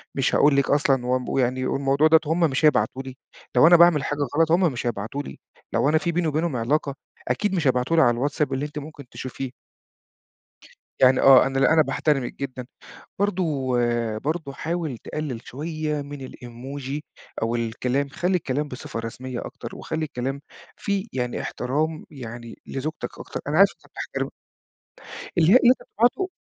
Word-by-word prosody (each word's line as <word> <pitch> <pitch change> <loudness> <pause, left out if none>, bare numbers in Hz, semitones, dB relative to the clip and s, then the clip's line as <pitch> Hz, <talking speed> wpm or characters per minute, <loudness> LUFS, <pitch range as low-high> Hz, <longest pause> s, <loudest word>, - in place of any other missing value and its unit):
مش 135 -2 +1
هاقول 145 -1 +5
لِك 140 -1 +2
أصلًا 135 -3 +2
ومب 125 0 0
ويعني 130 0 0
والموضوع 140 +3 +2
دوّة 160 0 +6
هم 160 +4 0
مش 155 -2 +2
هيبعتوا 135 -2 +2
لي، 130 -1 -9 0.4
لو 160 - +7
أنا 175 - +8
باعمل 170 -4 +6
حاجة 145 +1 -3 0.2
غلط، 165 -1 +3
هم 175 -1 +4
مش 120 0 -3
هيبعتوا 115 +6 -3
لي. - - -10 0.3
لو 140 - +2
أنا 155 - +4
فيه 165 +2 -1
بيني 170 0 0
وبينهم 155 0 0
علاقة، 140 +4 0 0.3
أكيد 205 -2 0
مش 160 -6 +1
هيبعتوا 125 +5 +2
لي 160 - +7
على 120 - +5
الواتساب 140 +4 -1
اللي 135 +2 -1
أنتِ 150 0 -6
ممكن 150 -1 -10
تشوفيه. 130 0 -6 1.5
يعني 130 0 +6
آه. 135 -1 +8
أنا 135 0 -1
لأ، 135 - +4
أنا 160 - +6
باحترمِك 145 -4 0
جدًا. 130 -2 -5 0.5
برضه 165 -10 0 0.5
برضه 155 +1 -3
حاول 160 -4 -3
تقلِّل 135 -1 -5
شوية 155 +1 -3
من 140 -2 -7
الemoji 130 +4 -7 0.4
أو 115 +1 0
الكلام، 125 +4 -1
خلّي 180 +6 0
الكلام 145 -1 -2
بصفة 125 -3 -6
رسمية 120 +2 -5
أكتر - - -8
وخلّي 160 0 -3
الكلام 135 -1 -4 0.4
فيه 200 +1 -2
يعني 125 -2 -2
احترام 155 +6 -2
يعني 120 -4 -9
لزوجتك 150 +4 -5
أكتر، - - -6
أنا - - 0
عارف - - +7
أنت - - -23
بتحترمها - - -4 1.1
اللي 165 +2 +5
هي - - +10
اللي 240 - +7
أنت - - -59
بتبعته، 245 - +1
140 Hz, 170 wpm, -24 LUFS, 130-155 Hz, 1.5 s, هي